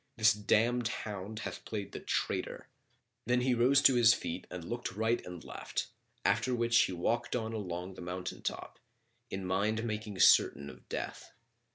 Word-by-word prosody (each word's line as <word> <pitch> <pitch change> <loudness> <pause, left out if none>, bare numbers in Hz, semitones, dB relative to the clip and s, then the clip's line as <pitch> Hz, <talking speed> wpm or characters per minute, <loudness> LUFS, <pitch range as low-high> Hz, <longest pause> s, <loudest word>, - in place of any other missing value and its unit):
This 110 0 +6
damned 115 +3 +2
hound 105 -1 -5
hath - - -6
played 100 -3 -5
the - - -6
traitor." - - -2 0.6
Then 125 0 +3
he 125 0 +2
rose 130 +4 +4
to 135 - +7
his 120 -1 +6
feet 85 - -5
and 90 -2 -6
looked 120 0 -4
right 110 +3 0
and 90 -2 -8
left, - - -4 0.4
after 125 +3 +2
which 115 0 +4
he - - -4
walked 120 +9 -1
on 115 -2 -2
along 90 -3 -4
the 90 - -10
mountain 90 +1 -5
top, - - -5 0.5
in 95 0 -4
mind 105 +4 0
making 110 -3 -4
certain 70 0 +5
of - - -18
death. - - -5
110 Hz, 170 wpm, -32 LUFS, 95-120 Hz, 0.6 s, to